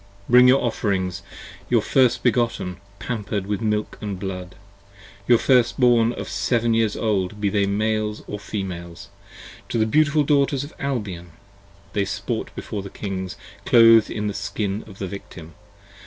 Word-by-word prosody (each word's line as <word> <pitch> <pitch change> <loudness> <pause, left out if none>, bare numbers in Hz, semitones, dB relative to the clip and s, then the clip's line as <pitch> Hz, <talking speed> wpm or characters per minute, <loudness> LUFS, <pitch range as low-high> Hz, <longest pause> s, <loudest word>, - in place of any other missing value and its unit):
30 - - -10
Bring 125 +1 +8
your 130 +2 +5
Offerings, 95 -6 -1 0.5
your - - +3
first 125 -3 +2
begotten, 115 -7 0 0.2
pamper'd 105 -4 -3
with 105 +2 -3
milk 105 -1 -2
& - - -24 0.2
blood: 90 -2 -6 0.7
Your 120 - +6
first 125 0 +2
born 120 -2 +4
of - - -6
seven 120 -1 0
years 115 -2 +1
old, 105 -2 -1
be 105 -1 +1
they 100 -1 +1
Males 105 +1 -1
or 105 - -5
Females, 95 -2 -6 0.6
To - - -1
the 110 - +3
beautiful 150 +5 +3
Daughters 140 -1 +2
of 145 - -10
Albion! 100 - -4 0.6
they 100 -1 +1
sport - - -3
before 105 - -5
the 100 - -8
Kings 95 -3 -5 0.3
Clothed 115 -2 +6
in 105 -1 -3
the 105 - -1
skin 100 +1 -3
of 100 -3 -13
the 100 - -4
Victim 85 -4 -10
105 Hz, 155 wpm, -22 LUFS, 100-120 Hz, 0.7 s, Bring